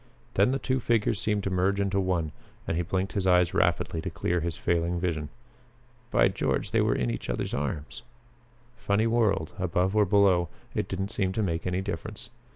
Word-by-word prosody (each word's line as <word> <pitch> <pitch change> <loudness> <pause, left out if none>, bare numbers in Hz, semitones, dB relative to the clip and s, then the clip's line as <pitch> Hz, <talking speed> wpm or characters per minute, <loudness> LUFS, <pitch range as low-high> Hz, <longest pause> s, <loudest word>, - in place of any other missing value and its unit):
Then 100 +5 +4
the 135 - +1
two 130 -1 -1
figures 115 -3 +1
seemed 105 -2 0
to 95 - -2
merge 95 +2 +1
into 100 0 +1
one 90 -5 0 0.4
and - - 0
he 85 - +1
blinked 95 +2 -2
his 95 -2 0
eyes 90 -1 +4
rapidly 80 - +1
to - - -3
clear 90 0 -1
his 85 0 -3
failing 85 0 0
vision. 80 -4 -2 0.8
By - - +4
George, - - -1
they - - +3
were - - +2
in - - 0
each - - -5
other's - - -2
arms! 75 +1 -3 0.7
Funny 110 -2 +1
world 105 -7 +1
above 90 +2 0
or 105 -1 +5
below 95 -3 +4 0.2
it - - -1
didn't 95 +2 -3
seem 95 -4 -1
to 110 - 0
make 85 -2 -2
any 90 +1 0
difference. 100 +5 -6
95 Hz, 190 wpm, -27 LUFS, 85-100 Hz, 0.8 s, or